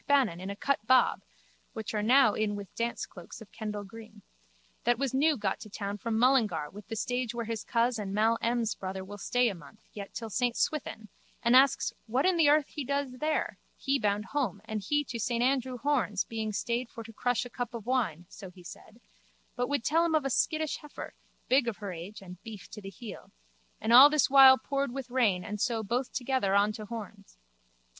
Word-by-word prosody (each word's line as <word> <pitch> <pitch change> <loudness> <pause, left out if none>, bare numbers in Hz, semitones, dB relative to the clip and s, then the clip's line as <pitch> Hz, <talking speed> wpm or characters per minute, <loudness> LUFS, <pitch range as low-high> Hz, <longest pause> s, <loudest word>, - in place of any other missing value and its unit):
Bannon 255 -12 +2
in 190 - -5
a 200 - -4
cut 280 +5 0
bob 255 0 +4 0.5
(which 220 -2 -5
are 210 - 0
now 230 0 +5
in 215 -1 -1
with 200 -1 -8
dance 235 0 -2
cloaks 175 -2 -12
of 220 - -14
Kendal 210 -2 -5
green) 215 0 -13 0.6
that 240 0 +2
was 270 0 -2
new 295 +2 +3
got 205 -3 -2
to 215 - -10
town 205 0 -5
from 225 0 -2
Mullingar 220 - +2
with 205 +1 -12
the 225 - -5
stage 245 +1 -2
where 235 -1 -3
his 225 -1 -4
coz 235 0 +1
and 200 -2 -4
Mal 220 +3 +2
M's 235 -1 0
brother 190 0 -6
will 205 +1 -9
stay 245 +4 +2
a 215 - -1
month 170 +5 -15
yet 200 -1 -8
till 225 -2 -5
Saint 245 +1 0
Swithin 250 -7 -2 0.4
and 235 +2 +4
asks 275 +1 +4
what 250 +6 +1
in 370 -1 +3
the 320 -4 +4
earth 300 -1 +3
he 295 - -5
does 275 -1 -2
there, 310 +2 -1 0.2
he 275 0 0
bound 205 -1 0
home 250 -9 -1
and 220 -1 -4
he 295 +9 0
to 240 -2 -3
Andrew 255 0 +1
Horne's 245 -7 0
being 220 -1 -4
stayed 235 +3 -2
for 230 - -9
to 225 0 -12
crush 245 +2 0
a - - -8
cup 245 -1 -4
of 225 -3 -7
wine, 215 - -1
so 195 0 -10
he 180 0 -16
said, 215 +6 -12 0.6
but 245 +1 -1
would 285 -4 0
tell 325 +5 +3
him 335 -2 +1
of 305 -3 +1
a 275 - 0
skittish 315 +3 0
heifer, 300 -2 -9 0.3
big 260 -1 +3
of 230 - -2
her 200 -3 -6
age 180 +4 -8
and 180 -1 -11
beef 220 -4 -10
to 210 - -9
the 195 - -7
heel, 210 +4 -10 0.5
and 220 +2 +1
all 265 +4 +11
this 300 -3 +2
while 265 -1 +9
poured 275 -1 -2
with 255 -1 -6
rain 215 -8 +2
and 210 0 -5
so 230 -4 0
both 245 +5 -2
together 250 -6 0
on 205 +1 +4
to 215 0 -7
Horne's. 210 -3 -9
230 Hz, 215 wpm, -29 LUFS, 205-260 Hz, 0.6 s, all